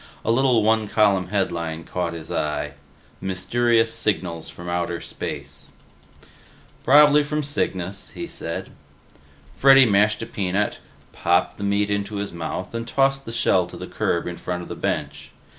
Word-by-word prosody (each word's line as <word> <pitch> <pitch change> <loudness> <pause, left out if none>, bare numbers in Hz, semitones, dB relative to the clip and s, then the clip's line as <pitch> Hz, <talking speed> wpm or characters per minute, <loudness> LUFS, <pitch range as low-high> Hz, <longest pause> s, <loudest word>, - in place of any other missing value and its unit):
A 115 - +2
little 125 -2 +3
one 110 0 +2
column 100 -3 +2
headline 85 -4 -2
caught 85 -1 -3
his 80 -1 -8
eye: 75 -1 -2 0.5
MYSTERIOUS 115 +5 +1
SIGNALS 90 -5 -1
FROM 85 - -10
OUTER 85 -1 -2
SPACE - - -7 1.1
"Probably 150 +2 +6
from 150 +1 -2
Cygnus," 100 - -2
he - - -4
said. - - -6 0.8
Freddy 135 +5 +7
mashed 105 -1 +3
a - - -4
peanut, 100 +1 -1 0.3
popped 85 +1 +1
the - - -4
meat 100 0 +1
into 100 +1 -2
his 100 -2 -4
mouth, 85 +3 -5
and 115 0 -4
tossed 135 +2 +1
the 115 - -6
shell 95 -6 +2
to - - -10
the - - -6
curb 85 - -1
in 90 -1 -5
front 90 0 -4
of - - -11
his - - -7
bench. - - -3
100 Hz, 155 wpm, -23 LUFS, 90-115 Hz, 1.1 s, Freddy